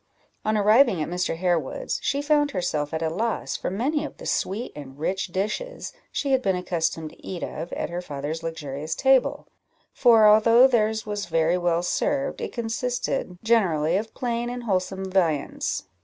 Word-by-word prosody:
On 215 0 +1
arriving 210 -1 +5
at 155 - -2
Mr. 180 -1 -1
Harewood's, 170 -5 -1
she 280 +1 -1
found 295 -1 +3
herself 155 - -2
at 160 0 -2
a 160 - +1
loss 225 +7 -2
for - - -3
many 275 +10 -1
of 300 - -7
the - - -10
sweet 210 +6 -1
and 140 -2 -10
rich 190 +6 -1
dishes 210 - -3 0.2
she 280 - -1
had 265 -1 +3
been 195 -5 +1
accustomed 165 -3 -2
to - - -20
eat 180 -2 -5
of 165 +3 -5
at - - -3
her 175 +1 -3
father's 150 0 -5
luxurious 155 -2 -4
table; 265 -1 +3 0.5
for 230 -4 +6
although 230 +4 +7
theirs 220 -4 +2
was 205 -2 -4
very 165 +1 +2
well 175 -1 +1
served, 275 +9 -1
it - - -4
consisted 235 -3 -2
generally 175 -8 +2
of 220 +3 -3
plain 240 -1 -2
and 245 0 -5
wholesome 190 -2 -1
viands. 165 -7 0
190 Hz, 170 wpm, -25 LUFS, 165-235 Hz, 0.5 s, although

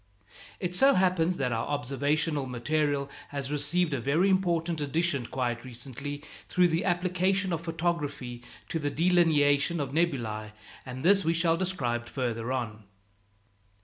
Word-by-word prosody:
It 180 -2 -3
so 270 +9 +5
happens 180 -2 +2
that 125 -3 0
our 115 0 -1
observational 145 +1 0
material 140 +3 0 0.2
has 140 -1 -4
received 150 +3 +1
a 135 - -1
very 160 +10 +2
important 170 -3 +1
addition 145 -3 0
quite 120 -2 -2
recently 135 +4 -7 0.3
through 180 -1 +4
the 165 +3 0
application 185 +1 +1
of 165 - -2
photography 160 -7 -3 0.3
to 165 - -1
the 145 -2 -1
delineation 160 -2 +3
of 140 - -2
nebulæ, 120 -10 -1 0.3
and 130 +3 -6
this 195 +1 +6
we 165 +1 +1
shall 165 0 +3
describe 130 -10 -1
farther 120 -2 -3
on. 110 -5 -3
150 Hz, 140 wpm, -28 LUFS, 130-175 Hz, 0.3 s, this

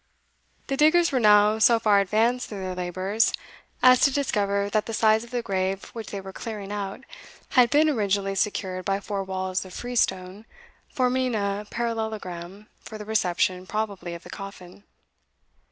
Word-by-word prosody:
The 275 - -2
diggers 335 +3 +4
were 260 - +1
now 210 -1 +5
so 230 +1 +6
far 210 -3 +3
advanced 225 +6 +1
in 205 - -5
their 185 -1 -4
labours 185 +5 0 0.5
as 255 -1 +7
to 280 - +5
discover 200 -7 0
that 210 +1 -1
the 225 - -3
sides 220 0 +3
of 235 - -12
the 245 -1 -3
grave 190 -1 -1
which 225 -3 -7
they 200 - -5
were 190 0 -9
clearing 210 -3 -6
out 200 +3 -4 0.5
had 250 -2 +5
been 295 +4 +4
originally 200 -7 0
secured 190 -2 -2
by 195 +1 0
four 200 -1 -4
walls 185 0 -3
of 185 -1 -11
freestone, 205 -4 -2 0.4
forming 255 -2 0
a 200 0 -2
parallelogram, 215 -5 -4
for 220 - -10
the 210 - -8
reception, 185 -3 0
probably, 200 -5 -3
of 170 - -11
the - - -11
coffin. 195 -1 -10
205 Hz, 165 wpm, -25 LUFS, 190-230 Hz, 0.5 s, as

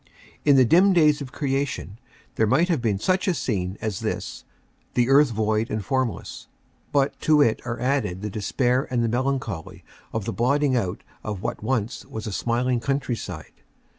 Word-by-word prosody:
In 145 -2 +5
the 130 -1 +6
dim 185 - +5
days 150 -3 +4
of 130 -2 -6
creation 135 -7 -2 0.3
there 110 - +2
might 170 - +3
have 160 -8 +1
been 110 -4 +1
such 185 - 0
a 185 - +2
scene 95 -8 -2
as 105 -4 -2
this - - -4 0.5
the 120 0 +2
earth 140 +1 +6
void 110 0 0
and 105 -2 -3
formless. 130 -3 -2 0.4
But 140 -1 +1
to 155 -1 +4
it 115 -5 +1
are 115 -1 -3
added 125 -8 -1
the 105 - -3
despair 125 +5 0
and 120 -2 0
the - - +2
melancholy 120 - -2 0.3
of 110 -3 -3
the - - -2
blotting 140 +3 +2
out 100 -5 -2 0.2
of 105 -3 -5
what - - -3
once 115 0 -2
was 110 -1 -7
a 110 - -4
smiling 120 +4 0
countryside. 120 - -3
125 Hz, 175 wpm, -24 LUFS, 110-140 Hz, 0.5 s, the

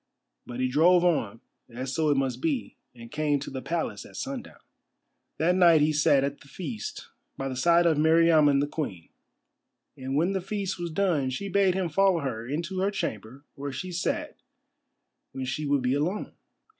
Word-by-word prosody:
But 120 0 -6
he 130 - +1
drove 170 +7 +4
on, 120 - 0 0.3
as 130 +2 -5
so 160 -2 +1
it 145 - +3
must 135 -2 -1
be, 300 -6 -2 0.2
and 115 -1 -12
came 150 -1 +1
to 140 - -7
the 130 -1 -5
Palace 170 +3 -3
at - - -14
sundown. 270 -2 -6 0.8
That 170 +3 +2
night 170 -4 +6
he 155 +1 +3
sat 145 -2 +4
at 140 +1 -3
the 145 - -16
feast 140 - -6 0.3
by 135 - -3
the 130 - -4
side 170 +6 +4
of 160 -3 +3
Meriamun 160 -3 +5
the 145 - 0
Queen. 100 - -5 0.9
And 135 -1 -4
when 170 +6 +2
the 190 - -1
feast 195 -1 -3
was 175 -1 -3
done 160 -6 +1
she 200 +10 -4
bade 195 -1 +3
him 190 -2 0
follow 185 +1 +2
her 115 -4 -4
into 170 +7 -3
her 195 +2 +2
chamber 125 - -5
where 140 0 -5
she 180 +8 -5
sat 175 0 -3 0.9
when 130 -1 -4
she 145 +4 -3
would 140 -2 +1
be 125 +1 +1
alone. 165 +9 -2
150 Hz, 185 wpm, -27 LUFS, 135-175 Hz, 0.9 s, night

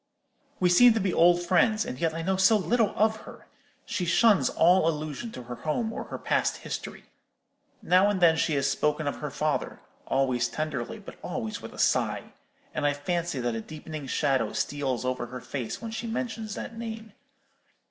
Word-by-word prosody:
"We 180 - +3
seem 230 +6 +7
to - - +2
be 190 -3 0
old 175 +1 +5
friends; 215 +5 +3
and 125 - -6
yet 165 -1 0
I 165 - -3
know 190 +2 +1
so 190 +4 +5
little 210 +3 +1
of 220 +1 +2
her. - - -13 0.4
She 185 - -2
shuns 185 - +4
all 175 0 +4
allusion 155 - -4
to 125 - -8
her 120 0 -7
home 220 +9 -2
or - - -5
her - - -6
past - - 0
history. - - -6 0.8
Now 185 +3 +4
and 205 -2 0
then 170 -2 +5
she 160 -1 +1
has 135 -1 +1
spoken 150 +2 0
of 145 - -2
her 150 - -4
father; 150 +1 -2 0.3
always 130 -3 +1
tenderly, 145 -5 -4
but - - -11
always 110 -1 -4
with - - -8
a - - -13
sigh; - - 0 0.4
and 150 - -2
I 145 0 +3
fancy 170 0 -2
that 120 -1 -1
a 115 - -3
deepening 155 +2 -8
shadow 130 -5 +1
steals 135 -4 -2
over 125 -1 -2
her 125 +1 -7
face 125 - -5
when 225 - -5
she 225 +1 -4
mentions 225 -2 -4
that 230 - -6
name. 225 -1 -7
165 Hz, 190 wpm, -27 LUFS, 140-210 Hz, 0.8 s, seem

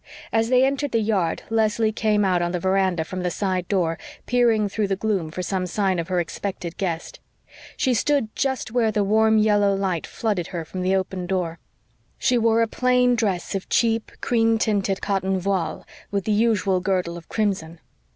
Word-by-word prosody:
As 225 0 +2
they 255 +1 +5
entered 275 0 -1
the 230 - +3
yard 205 -6 0
Leslie 220 0 +2
came 210 -1 +1
out 180 -2 +2
on 175 0 -1
the 180 - -1
veranda 190 -2 +1
from 185 +3 -5
the 180 - 0
side 185 -1 -2
door, 175 -5 0 0.3
peering 235 -4 +3
through 205 +1 -1
the 195 - 0
gloom 195 -5 -1
for 180 +3 -5
some 185 0 -2
sign 190 -1 0
of 165 - -3
her 185 -1 0
expected 175 0 -4
guest. 170 -4 -3 0.6
She 260 - +2
stood 245 -2 0
just 265 -5 -1
where 230 -2 +2
the 210 -1 +1
warm 220 +2 +3
yellow 205 -2 +3
light 190 -4 -2
flooded 205 -7 -2
her 170 -3 -5
from 185 +3 -6
the 185 +1 +2
open 185 -1 -2
door. 175 -3 -2 0.6
She 250 - +2
wore 230 0 +3
a - - 0
plain 250 +1 +2
dress 205 -7 -1
of 195 -1 -4
cheap, 225 -1 +1
cream 225 -1 +2
tinted 200 -3 0
cotton 195 -1 0
voile, 185 -2 -2 0.2
with 200 -2 -2
the 215 - 0
usual 205 -4 +2
girdle 180 -2 -1
of 170 -1 -11
crimson. 185 -7 -2
200 Hz, 190 wpm, -23 LUFS, 185-225 Hz, 0.6 s, they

